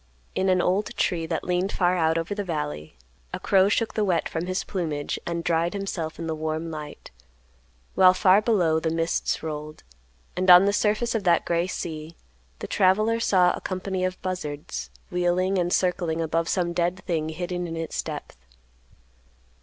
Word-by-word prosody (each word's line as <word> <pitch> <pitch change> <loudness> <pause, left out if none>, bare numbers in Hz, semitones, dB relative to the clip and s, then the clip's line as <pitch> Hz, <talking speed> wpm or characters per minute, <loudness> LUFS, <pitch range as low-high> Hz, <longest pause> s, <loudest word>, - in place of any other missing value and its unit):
In 190 - +1
an 185 -1 +3
old 195 +4 0
tree 165 -3 0
that 165 -1 -2
leaned 180 +2 0
far 180 -1 +2
out 160 -2 +2
over 165 +4 -2
the 205 0 -3
valley, 75 - -4 0.3
a - - -4
crow 195 0 +3
shook 220 +1 0
the 215 - 0
wet 180 -4 +1
from 165 +2 -4
his 185 +1 -1
plumage 155 -7 -3
and 170 -1 -2
dried 170 +1 +1
himself 190 -5 -4
in 170 - -5
the 160 - -2
warm 155 +1 -3
light; 150 -1 -8 0.8
while 185 0 +6
far 190 +2 +5
below 180 -8 +2
the 160 - -1
mists 165 +1 -1
rolled, 155 -1 -6 0.5
and 185 +1 0
on 180 +2 +9
the 200 - +2
surface 215 +3 +1
of 225 -3 -1
that 170 -2 +3
gray 170 +1 0
sea, 160 -3 -6 0.4
the - - -6
traveler 215 +4 +2
saw 180 -5 +4
a - - -5
company 185 0 -3
of 185 0 -2
buzzards, 150 - -4 0.2
wheeling 180 +2 +1
and 175 0 0
circling 175 -3 0
above 165 +1 0
some 175 -2 0
dead 175 +2 -1
thing 160 -3 -1
hidden 175 +2 -4
in 165 0 -5
its 165 0 -3
depth. - - -7
175 Hz, 175 wpm, -25 LUFS, 160-185 Hz, 0.8 s, on